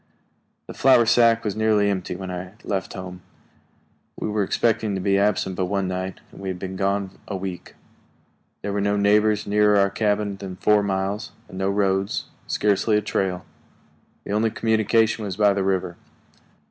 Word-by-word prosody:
The - - -9
flour 130 -3 +5
sack 115 0 +4
was 105 - -1
nearly 110 -2 +2
empty 95 -3 -2
when 95 0 -6
I 90 +1 -6
left 95 -2 -3
home. 90 -1 -8 1.0
We - - -2
were 105 0 0
expecting 110 +1 +1
to - - -2
be 100 +1 +2
absent 100 -2 +1
but 90 0 -1
one 100 0 -1
night, 95 0 -4
and - - -13
we 95 - -5
had 95 -1 -3
been 95 +1 -6
gone 100 0 -1
a 100 - -4
week. 95 -2 -7 0.9
There 100 0 -2
were 100 - 0
no 100 0 +1
neighbors 105 +1 +3
nearer 105 0 +3
our 100 0 +3
cabin 105 -1 0
than 95 -2 -7
four 105 +3 +3
miles, 100 +1 -2
and 95 - -9
no 95 0 +1
roads 100 -1 0 0.2
scarcely 105 +1 +2
a - - +1
trail. 95 -3 -2 0.8
The - - -7
only 110 +2 +2
communication 110 0 +1
was 100 -2 -4
by 105 -1 +4
the 100 -1 -1
river. 95 -2 -1
100 Hz, 175 wpm, -23 LUFS, 95-105 Hz, 1.0 s, flour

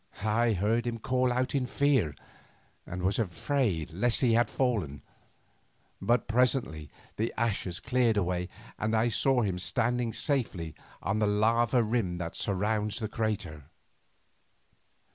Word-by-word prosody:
I 110 +2 +2
heard 110 +5 +1
him 115 -1 -2
call 125 +2 +1
out 125 +1 0
in 135 -3 0
fear, 130 - +2 0.7
and 90 0 -5
was 95 +4 +1
afraid 95 - -1
lest 115 +8 +1
he 120 -4 +4
had 115 -1 +3
fallen; 100 - -1 1.0
but 120 +1 +2
presently 115 - +1 0.3
the 110 +2 0
ashes 100 -6 -1
cleared 125 -3 +2
away, 90 -1 -1 0.3
and 110 +1 0
I 115 +2 +3
saw 125 +2 +2
him 95 -3 -1
standing 120 +3 0
safely 110 - -1 0.3
on 100 +2 0
the 105 - +2
lava 115 +3 +3
rim 110 -6 -1
that 85 -1 -5
surrounds 105 +2 -1
the 110 -3 -3
crater. 95 -10 -3
110 Hz, 135 wpm, -29 LUFS, 95-120 Hz, 1.0 s, he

